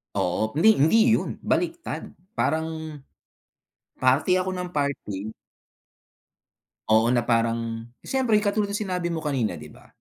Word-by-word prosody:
Oo. 100 +3 0
Hindi, 160 +8 +3
hindi 160 +11 +4 0.2
yun - - -4
baliktad 335 - -2 0.3
parang, 160 -2 -2 1.0
party 130 +8 +3
ako 185 +1 -1
nang 180 -1 -4
party 110 - -3 1.6
Oo, 110 +1 +5
na 120 - +2
parang, 115 -1 0 0.2
siyempre 255 -5 +1
katulad 205 0 +1
ng 200 - -3
sinabi 180 -3 -2
mo 165 -2 -3
kanina, 130 -10 -1
'di 75 - -11
ba? - - -18
150 Hz, 125 wpm, -25 LUFS, 115-180 Hz, 1.6 s, Oo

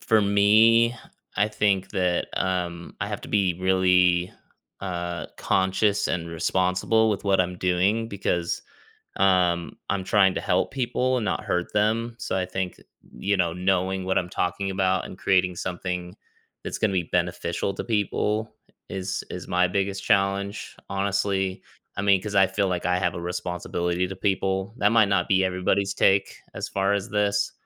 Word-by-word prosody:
for 110 -1 +3
me 110 +4 +5 0.4
I 105 +2 +3
think 100 -3 0
that, 90 -3 0
um, 90 -2 -2
I - - -2
have - - -4
to - - -9
be 95 -4 +2
really, 90 -1 +3 0.5
uh, 85 -2 -4
conscious 95 +2 +1
and 85 -1 -2
responsible 95 +6 +1
with 105 - -3
what 95 -1 +3
I'm 90 0 -2
doing 95 +6 +1
because, 90 -4 -2 0.5
um, 90 -3 +2
I'm 95 -1 -1
trying 95 0 +4
to - - -2
help - - +1
people 130 0 0
and 120 - -1
not - - -1
hurt 90 0 -2
them, 115 +3 0
so, 95 - -3
I 95 - 0
think, 95 -1 -4 0.4
you 100 0 0
know, 85 -2 +1
knowing 95 +1 0
what 95 0 +1
I'm 90 - -2
talking 95 +3 -2
about 95 -1 0
and 90 - -11
creating 90 -2 +2
something 90 0 -4 0.5
that's - - -4
gonna 110 -3 +1
be 95 -2 +1
beneficial 90 +1 -1
to - - -5
people 105 0 -1 0.4
is 95 0 -3
is - - -7
my 90 0 +3
biggest 100 +1 -2
challenge 100 0 0
honestly, 100 -1 -1 0.3
I 100 - -2
mean, 100 -2 +3
'cause 105 0 -5
I 95 0 +6
feel 95 +1 0
like 90 -2 -2
I 90 0 +2
have 90 -1 0
a 85 - -5
responsibility 90 0 -2
to 95 - -6
people. 95 +1 -1
That 105 0 +3
might 110 -3 +5
not 100 -3 +1
be 95 -1 +3
everybody's 95 +1 0
take 95 0 +2 0.2
as - - -4
far 95 0 0
as 100 +2 -2
this, 100 -1 +1
95 Hz, 165 wpm, -25 LUFS, 90-100 Hz, 0.5 s, I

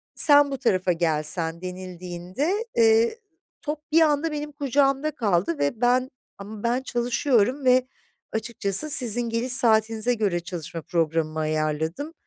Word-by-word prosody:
"Sen 290 -2 +7
bu 275 - -3
tarafa 185 -5 +1
gelsen..." 165 0 0
denildiğinde, 185 - -5
eee, 230 - +3 0.4
top 300 0 -4
bir 325 +2 +4
anda 305 0 +1
benim 295 0 -5
kucağımda 280 +1 0
kaldı 180 - -1
ve 145 +11 -2
ben 255 +2 +1 0.3
"Ama 205 +1 -10
ben 240 +2 0
çalışıyorum 250 +1 0
ve 255 0 +3 0.5
açıkçası 220 +3 -1
sizin 245 -3 +3
geliş 235 +2 0
saatinize 225 0 +3
göre 200 -6 -1
çalışma 170 -1 -7
programımı 160 -1 -2
ayarladım. 155 - -3
225 Hz, 125 wpm, -24 LUFS, 175-270 Hz, 0.5 s, Sen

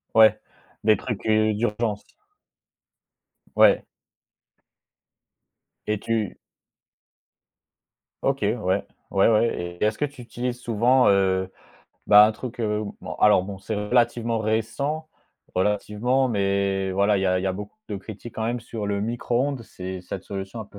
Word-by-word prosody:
Ouais, 110 -1 +7 0.4
des 110 0 +5
trucs, 120 -6 -5
heu, 110 0 +3
d'urgence. 105 -1 -1 1.5
Ouais. - - +5 2.0
Et 105 -1 0
tu 110 -3 -2 1.9
OK, 135 0 0
ouais, 105 +3 +1
ouais, 95 -2 0 0.4
ouais, 95 -6 +1
et - - -1
est-ce 105 0 0
que - - -1
tu 145 -3 -4
utilises 120 +1 -4
souvent, 125 +2 +3
heu, 95 -1 +2 0.6
bah 105 0 +9
un 110 - +2
truc, 120 +3 -8
heu 105 -1 0 0.2
bon - - -6
alors, 105 -3 +5
bon, 95 0 -7
c'est 110 +3 -4
relativement 115 +2 +1
récent, 125 +9 -1 0.5
relativement, 105 +7 +1
mais 100 -2 0
voilà 100 +2 +3
il - - -1
y 95 - +1
a 90 0 +2
il - - -5
y - - -1
a 95 - 0
beaucoup 105 - -8
de - - -3
critiques 110 +3 -9
quand 110 - -3
même 120 +2 -1
sur 110 -2 -5
le 100 0 -1
micro-ondes, 120 +4 -1
c'est 95 -4 -7
cette 90 +1 -7
solution 95 +3 -6
un - - -4
petit - - -28
105 Hz, 145 wpm, -24 LUFS, 100-120 Hz, 2.0 s, bah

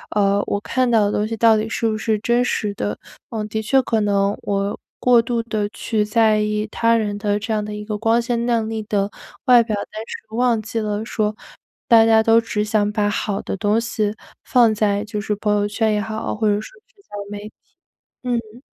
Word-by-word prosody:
呃， 200 -1 +3
我 205 - -1
看 255 +3 0
到 225 -3 +4
的 205 - 0
东 210 - 0
西 225 0 -4
到 225 0 +5
底 215 +1 -2
是 230 - -1
不 215 - -1
是 220 0 0
真 240 +3 +2
实 210 -4 -1
的。 105 - -3 0.3
嗯， 215 -2 -4
的 220 +1 -3
确 245 +5 +3
可 225 -2 0
能， 200 -1 +1
我 200 0 -2 0.2
过 245 -2 +5
度 235 0 -1
的 210 -2 -2
去 215 0 -1
在 215 0 +3
意， 210 0 -1
他 230 0 +2
人 210 -2 -1
的 205 -1 0
这 220 +1 -3
样 210 -1 0
的 210 0 -6
一 210 0 -7
个 210 -1 -3
光 225 +1 +3
鲜 235 0 -1
亮 230 -2 +1
丽 220 -1 -3
的 205 -1 -1 0.3
外 245 -2 +7
表， 220 -2 -2
但 205 +1 -6
是 220 0 -9
忘 240 -2 +2
记 225 +1 -4
了， 210 0 -2
说， 215 -2 -1 0.5
大 225 -1 +7
家 225 0 +5
都 225 +1 +5
只 210 -2 -2
想 210 -1 +1
把 210 -1 0
好 205 -1 -2
的 - - -4
东 210 +2 +2
西 215 -3 -1 0.3
放 235 -4 +4
在 205 -1 +1
就 210 0 -4
是 210 0 -2
朋 210 0 0
友 205 0 +1
圈 220 +1 0
也 210 - 0
好， 220 +1 -4
或 215 0 0
者 205 - +3
说 - - -5
社 485 - -15
交 205 - -9 0.2
媒 205 - -5
体， - - -30 0.7
嗯。 235 -1 -3
215 Hz, 240 characters per minute, -21 LUFS, 210-230 Hz, 0.7 s, 外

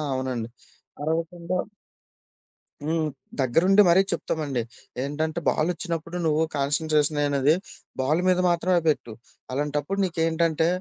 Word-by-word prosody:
అవునండి. 125 -3 -3 0.5
అరవకుండా 170 +3 -2 1.3
హ్మ్. 160 0 0 0.3
దగ్గరుండి 175 +11 +4
మరీ 185 +3 +6
చెప్తమండి. 150 -6 -2 0.4
ఏంటంటే, 155 +3 -2
బాలొచ్చినప్పుడు 170 +1 -2
నువ్వు 155 0 +3
కాన్సంట్రేషనయినది, 145 0 +2 0.4
బాల్ 155 +6 +2
మీద 180 -1 +4
మాత్రమే 175 +1 +2
పెట్టు. 120 -6 -1 0.4
అలాంటప్పుడు 145 +6 -1
నీకేంటంటే, 165 -2 +1
160 Hz, 90 wpm, -25 LUFS, 145-170 Hz, 1.3 s, మరీ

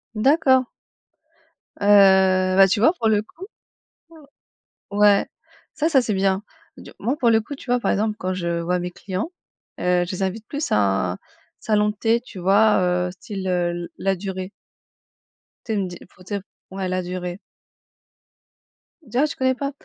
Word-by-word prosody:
D'accord. 260 +2 +3 1.1
Heu, 190 -2 +5
ben 195 0 +8
tu 195 +3 0
vois, 255 +10 +5
pour 230 -11 -1
le 210 -1 +3
coup, 330 - -12 1.5
ouais, 205 0 +4 0.5
ça 315 +2 0
ça 270 -5 +4
c'est 220 -3 -2
bien. 190 0 +1 0.4
Tu - - -12
moi, 255 +5 -1
pour 240 - +2
le 220 0 +4
coup, 285 +7 -8
tu - - -14
vois, 245 - +3
par - - 0
exemple 215 +1 0
quand 185 0 -3
je 170 -2 -2
vois 180 +2 -1
mes 180 0 -4
clients, 190 - -5 0.5
heu, 180 0 +1
je 175 - -6
les 190 +1 -3
invite 195 +4 -3
plus 290 +1 -4
à 95 -3 +1
un, - - -9 0.4
salon 210 -1 +1
de 210 - -5
thé, 225 +2 +1
tu 245 -5 -13
vois? 200 +4 +4 0.3
Heu, - - -5
style, 190 +1 -7
heu 180 -1 +1
l 175 0 -6
Ladurée. 190 -1 -3 1.2
Tu 225 - -2
sais - - 0
une 190 - -1
di 175 -1 -8
pour 185 0 -19
dire, 200 +2 -4 0.3
ouais 190 0 -4
Ladurée. 180 0 -4 1.6
Dis, 240 -3 -6
ah 280 - +4
tu - - -7
connais 260 0 +1
pas? 280 +2 -3
195 Hz, 170 wpm, -22 LUFS, 185-225 Hz, 1.6 s, ben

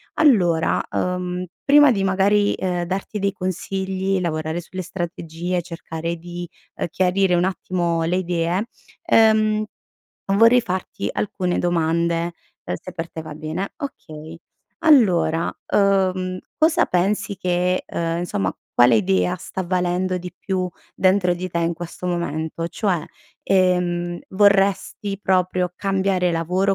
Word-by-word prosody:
Allora, 180 - +3
uhm, 180 0 -2 0.2
prima 290 0 +7
di, 200 -5 0
magari, 200 +2 +3
ehm, 180 -2 -2
darti 195 +4 -3
dei 200 0 0
consigli, 190 +1 -2
lavorare 160 0 -2
sulle 185 +2 -6
strategie, 175 0 -4
cercare 165 -1 -5
di, 175 +1 -7 0.3
uhm, - - -2
chiarire 185 +1 +2
un 175 - +2
attimo 175 -2 -1
le 170 +2 0
idee, 175 +3 -1 0.4
ehm, 215 -6 +4 0.7
vorrei 230 +4 +6
farti 185 -4 -4
alcune 180 -3 -1
domande, 170 0 0 0.3
uhm, 90 - -2
se - - -9
per 165 0 -5
te 160 - -6
va 155 -1 -8
bene. 155 +6 -4
Okay. 160 - -8 0.5
Allora, 180 - +4 0.2
uhm, 185 -2 +2 0.2
cosa 315 +1 +4
pensi 200 +3 0
che, 180 0 0
uhm, 165 0 -2
insomma, 100 - -2 0.2
quale 120 0 +6
idea 95 - +1
sta 185 +1 -5
valendo 180 +1 0
di 180 0 -8
più 185 -2 -2 0.3
dentro 185 -1 +3
di 185 +1 -4
te 170 - -1
in 170 0 0
questo 175 +2 -7
momento? 165 -1 -2
Cioè, 180 -5 -1 0.4
ehm, 180 -2 +1
vorresti 200 0 +2
proprio 185 -1 +1
cambiare 190 -2 +1
lavoro 180 +4 +1
180 Hz, 130 wpm, -22 LUFS, 170-195 Hz, 0.7 s, prima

